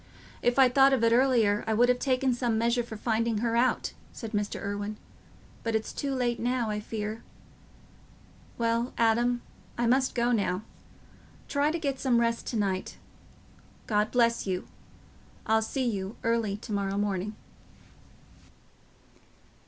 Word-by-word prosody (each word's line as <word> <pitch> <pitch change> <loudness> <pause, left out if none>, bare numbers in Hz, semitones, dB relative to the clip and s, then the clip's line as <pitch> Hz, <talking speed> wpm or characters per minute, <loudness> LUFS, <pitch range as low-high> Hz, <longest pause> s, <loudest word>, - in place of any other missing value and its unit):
"If 245 +1 +1
I'd 260 -2 +6
thought 270 0 +6
of 250 -4 +1
it 230 0 +4
earlier, 235 -5 +3
I 220 - +1
would 240 +3 +5
have 250 0 +2
taken 260 -1 +1
some 240 -2 0
measures 235 +1 +1
for 220 - -6
finding 230 0 0
her 230 +1 0
out," 250 +2 +1 0.2
said 225 -2 -7
Mr. 205 -2 -2
Irwine, 205 +1 -4 0.6
"but 230 -1 -1
it's 220 0 -2
too 275 -1 -2
late 240 -2 0
now, 240 -2 0
I 210 - -2
fear... 215 +1 -5 1.4
Well, 230 +1 0
Adam, 240 +1 +2 0.3
I 240 - +1
must 260 +3 +2
go 240 0 +2
now. 200 -4 0 0.8
Try 285 +1 +1
to 325 - -1
get 280 -5 -2
some 250 -3 +2
rest 230 0 0
to 235 - -2
night. 195 -3 -2 0.9
God 210 0 +1
bless 235 -3 +2
you. 185 -1 -2 0.8
I'll 220 0 +3
see 260 +4 -2
you 195 -2 -3
early 230 -3 0
to 220 +1 -10
morrow 200 -1 -1
morning." 205 0 -1
230 Hz, 150 wpm, -28 LUFS, 210-245 Hz, 1.4 s, I'd